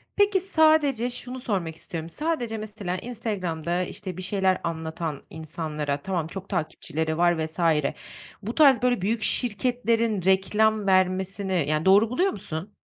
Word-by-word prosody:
Peki, 405 -1 +3
sadece 310 - +3
şunu 250 +1 -4
sormak 190 -10 -2
istiyorum. 165 0 -6
Sadece, 245 - -2
mesela, 205 -4 -4
Instagram'da, 185 -7 -3
işte, 185 -1 -6
bir - - -5
şeyler 190 0 +1
anlatan 160 -2 -4
insanlara, 155 -3 -4
tamam, 175 -5 -2
çok 195 +3 -8
takipçileri 160 -2 -2
var 170 -2 +2
vs. 160 +3 -8 0.8
bu 225 +4 -5
tarz 275 -6 +6
böyle 245 -5 +2
büyük 220 +3 0
şirketlerin 230 -3 +1
reklam 205 +2 +2
vermesini, 185 -2 +1
yani, 155 +2 0
doğru 205 +4 +6
buluyor 365 +10 +1
musun? 190 0 -6
190 Hz, 135 wpm, -25 LUFS, 170-230 Hz, 0.8 s, tarz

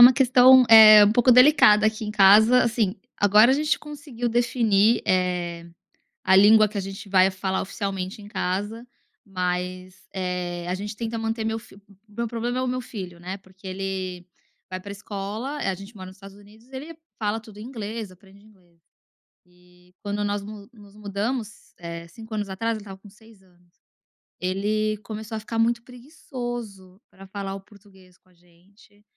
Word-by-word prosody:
uma 245 +2 +10
questão, 255 0 +6
eh, 215 -2 +10
um 205 - +3
pouco 245 +2 +3
delicada 250 -5 +6
aqui 220 0 -2
em 210 - -4
casa, 215 +4 +6
assim, 225 -4 0 0.2
agora 210 +4 +5
a - - +4
gente 300 +2 0
conseguiu 285 -5 -6
definir, 230 -2 +2
eh, 180 -2 -1 0.6
a 190 0 +4
língua 215 +2 +6
que 205 0 -6
a - - 0
gente 195 +1 -8
vai 190 0 +4
falar 190 0 -3
oficialmente 195 -1 -5
em 205 - -12
casa, 205 +4 -4 0.4
mas, 185 -1 -5
eh, 180 -2 -4
a 180 - -1
gente 205 +3 -6
tenta 230 0 -4
manter 225 0 -3
meu 225 0 -2
fi 220 - -17 0.3
meu 235 +3 -4
problema 240 +2 -3
é - - -1
o - - -2
meu 255 0 -2
filho, 185 -8 -9
né. 185 +3 -7
Porque 190 0 -18
ele 185 -1 -5 0.4
vai 185 - -4
pra 200 +2 -9
escola 205 +7 -6
a 195 -9 -2
gente 195 +4 -12
mora 185 -1 -9
nos 185 - -13
Estados 195 0 -14
Unidos, 210 +4 -19
ele 290 +5 -9 0.2
fala 215 0 -2
tudo 215 -2 -15
inglês, 220 -2 -7
aprende 195 +2 -20
inglês. 180 -6 -25 0.7
E 180 0 -25
quando 205 0 -3
nós 205 0 -2
no 205 0 -11
nos 205 -3 -18
mudamos, 210 +2 -5
eh, 170 -1 -8
5 220 +6 -11
anos 210 -1 -3
atrás, 225 +4 -2
ele - - -8
estava 195 -2 -11
com 205 - -16
6 220 0 -21
anos, 175 -2 -28 0.7
ele 210 +3 -1
começou 220 +1 -7
a - - -3
ficar 225 +1 -5
muito 235 +1 +1
preguiçoso 240 - -9
pra 195 0 -15
falar 195 0 -6
o 195 - -9
português 190 -3 -21
com 185 - -34
a - - -27
gente, 180 +4 -26
205 Hz, 175 wpm, -23 LUFS, 190-225 Hz, 0.7 s, uma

